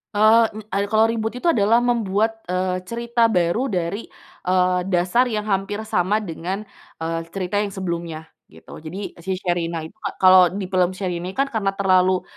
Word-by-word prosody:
Eee, 220 +2 +6 0.3
nye 200 - 0
kalau 220 +1 +4
reboot 225 0 -2
itu 335 +8 0
adalah 230 0 +3
membuat, 225 -2 0
eee, 185 0 -1
cerita 235 0 +1
baru 200 +6 +1
dari, 185 +1 -3 0.4
eee, 180 0 +3
dasar 185 +7 +2
yang 215 -3 -2
hampir 205 +1 -2
sama 210 +1 0
dengan, 185 +3 -4 0.4
eee, 165 0 -1 0.2
cerita 195 +1 -1
yang 210 - 0
sebelumnya, 170 -4 -4 0.2
gitu. 80 +1 -13
Jadi 170 +6 -6
si 190 +2 -3
Sherina 170 -3 -2
itu 160 - -9 0.2
kalau 185 -1 +7
di 195 -1 -5
film 185 0 +2
Sherina, 180 -1 -4
kan, 275 +1 0
karena 200 -3 -1
terlalu, 185 -1 +3
190 Hz, 160 wpm, -22 LUFS, 180-220 Hz, 0.4 s, kalau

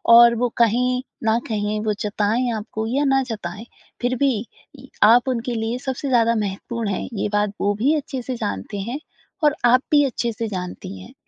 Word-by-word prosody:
और 235 0 +8
वो 245 +1 0
कहीं 250 +2 +2 0.2
न 220 +1 +3
कहीं 210 -1 -1
वो 215 - +2
जताएँ 215 +4 0
आपको 220 +1 -4
या 275 +5 +1
ना 270 -1 +3
जताएँ 215 0 -6 0.4
फ़िर 245 +1 +1
भी 275 +2 +3 0.5
य - - -13 0.2
आप 235 +4 +6
उनके 245 0 -2
लिए 225 +2 -1
सबसे 265 +2 -4
ज़्यादा 230 -2 +4
महत्वपूर्ण 215 +2 -3
हैं 195 - -2
ये 205 - -1
बात 205 0 +2
वो 205 0 +2
भी 280 +6 +4
अच्छे 270 -3 -3
से 255 +1 -4
जानते 100 - -4
हैं 240 +8 -4 0.4
और 300 -1 +4
आप 250 +1 +5
भी 295 -1 +6
अच्छे 240 -2 -1
से 225 +1 -3
जानती 180 - -6
हैं। 95 - -13
230 Hz, 190 wpm, -22 LUFS, 210-250 Hz, 0.5 s, और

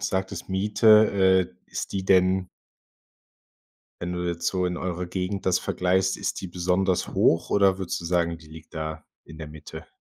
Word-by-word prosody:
sagtest 95 -1 -3
Miete, 100 -2 +4
äh, 65 - -30
ist - - -5
die 95 -1 -3
denn 95 -1 +3 1.5
wenn 90 0 -4
du 90 0 -3
jetzt 85 0 -3
so 90 0 0
in 90 0 -2
eurer 90 0 -4
Gegend 95 +2 -4
das 90 -1 +2
vergleichst, 95 +1 0
ist - - -3
die - - -5
besonders 90 +1 0
hoch, 80 - +2
oder 95 -2 +3
würdest 95 -3 -3
du - - -9
sagen, 85 -1 0
die 80 - -17
liegt 80 +1 -14
da 80 -1 -5 0.2
in 80 - -13
der 80 -2 -7
Mitte? 75 0 -11
90 Hz, 175 wpm, -25 LUFS, 85-95 Hz, 1.5 s, Miete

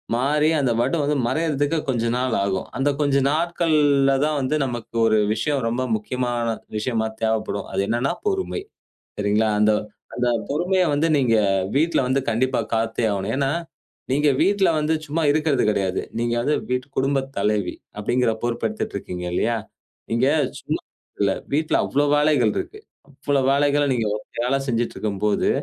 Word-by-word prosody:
மாறி 150 +5 +2
அந்த 130 -4 +1
வடு 130 +7 +1
வந்து 145 +1 +1
மறையறதுக்கு 155 +1 0
கொஞ்ச 120 -3 0
நாள் 125 -2 0
ஆகும். 95 -1 -2
அந்த 140 +2 +2
கொஞ்ச 140 -2 +2 0.2
நாட்கள்ல 155 -4 +2
தான் 155 -1 0
வந்து 130 +3 0
நமக்கு 120 -2 -6
ஒரு 110 -1 +4 0.2
விஷயம் 135 +4 -1
ரொம்ப 120 +3 -1
முக்கியமான 120 +1 -2 0.3
விஷயமா 110 0 -1
தேவைப்படும். 110 -2 -1
அது - - +1
என்னன்னா 120 +4 0 0.2
பொறுமை. 390 0 -1 0.6
சரிங்களா? 105 +2 +2
அந்த 105 0 +5 0.4
அந்த 125 0 0 0.2
பொறுமைய 180 +6 +1
வந்து 155 +3 +2
நீங்க 125 -5 +3 0.4
வீட்ல 160 +4 +2
வந்து 135 +2 +2
கண்டிப்பா 125 +2 +1
காத்தே 115 +1 0
ஆகணும். 100 +2 -2
ஏன்னா, 135 -1 +1 0.6
நீங்க 145 +2 +3
வீட்ல 195 -2 +3
வந்து 155 +1 +1
சும்மா 155 +3 -2
இருக்கறது 150 -3 +1
கிடையாது. 95 -3 0 0.2
நீங்க 120 0 0
வந்து 145 +5 +1 0.2
வீட்டு 125 +1 -1
குடும்பத் 135 0 0
தலைவி 105 -1 0 0.2
அப்படிங்கிற 120 +2 +1
பொறுப்பு 120 -1 -1
எடுத்துட்டு 220 0 -5
இருக்கீங்க 90 0 -6
இல்லையா? 115 +5 +1 0.6
இங்க 120 +3 +2 0.3
சும்மா - - -3 0.4
இல்ல. - - +3 0.2
வீட்ல 155 +2 +1
அவ்வளவு 145 +1 +1
வேலைகள் 145 -8 +3
இருக்கு. 425 - -5 0.3
அவ்வளவு 140 -1 -1
வேலைகளை 145 +1 +2
நீங்க 115 -3 0
ஒத்தையாளா 125 +5 -2
செஞ்சிட்டு 120 -1 -1
இருக்கும்போது, 105 0 0
130 Hz, 150 wpm, -22 LUFS, 115-145 Hz, 0.6 s, அந்த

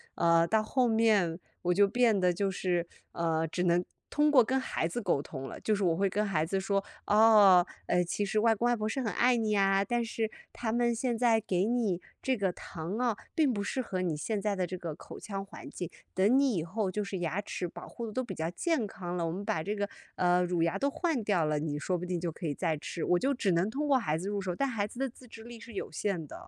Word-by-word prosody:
呃， 170 0 +4
到 220 +3 +3
后 250 +3 +1
面 215 -7 +3 0.2
我 180 0 +2
就 200 +2 +5
变 235 0 +3
得 180 -1 +3
就 195 +3 0
是， 180 -2 0 0.3
呃， 165 -1 0
只 180 +3 -2
能 175 0 +3 0.3
通 295 +1 +3
过 270 -4 +7
跟 260 +4 0
孩 210 -10 -1
子 240 +8 -4
沟 195 - +1
通 135 -2 -7
了。 - - -8
就 215 - 0
是 200 - -2
我 170 -3 +3
会 195 +3 +2
跟 210 +3 0
孩 170 -6 0
子 195 +4 -1
说： 195 +1 0 0.2
“哦， 210 -4 +7 0.2
呃， 180 0 +3
其 175 +4 -2
实 205 +2 -1
外 225 +1 +4
公 230 +3 0
外 240 - +3
婆 215 -2 -2
是 265 +5 -2
很 225 -4 -1
爱 250 +1 +4
你 215 -2 +1
啊， 195 0 +3
但 240 +3 0
是 225 -1 -2 0.2
他 230 -2 -3
们 240 +1 +2
现 235 0 -1
在 230 -2 +3
给 190 -3 0
你 220 -6 0 0.2
这 260 -1 0
个 195 -3 +1
糖 175 +6 -6
哦， 240 -4 +1 0.2
并 310 -5 +3
不 205 -4 -2
适 260 +6 -2
合 185 -6 -3
你 170 -4 0
现 205 +8 -2
在 205 0 -1
的 185 -2 -1
这 185 - -5
个 170 -3 -5
口 - - -11
腔 195 -2 -5
环 195 - -11
境。 175 - -5 0.2
等 200 +8 +4
你 275 -2 +3
以 165 - -1
后， 190 +3 -2
就 210 +3 -2
是 195 -1 -4
牙 175 +3 -1
齿 185 -3 -4
保 - - -10
护 235 - -6
得 220 - -6
都 255 - -1
比 195 -6 -6
较 160 0 -2
健 315 - 0
康 180 -3 -6
了， 170 - 0
我 165 - -1
们 190 +4 -5
把 160 -5 -1
这 205 +4 -2
个， 205 -1 -2 0.3
呃， 180 0 +3
乳 175 -1 0
牙 170 +3 +1
都 280 - +1
换 315 -7 -1
掉 195 -6 +2
了， 150 0 0
你 150 -1 -3
说 180 +4 -1
不 175 - -5
定 180 -1 -2
就 170 0 -2
可 165 - -8
以 150 - 0
再 155 +2 -1
吃。” 160 +3 -6
我 180 - +3
就 275 +6 +1
只 215 -7 0
能 170 +3 +2
通 295 +5 -2
过 275 -2 +5
孩 155 -10 0
子 185 - -5
入 205 0 -1
手， 185 -2 -3
但 275 - 0
孩 220 -5 -1
子 240 - -11
的 270 0 0
自 250 +1 -16
制 225 -1 -11
力 235 0 -10
是 230 - -11
有 195 - -5
限 170 -1 -2
的。 - - -11
200 Hz, 290 characters per minute, -30 LUFS, 175-230 Hz, 0.3 s, 过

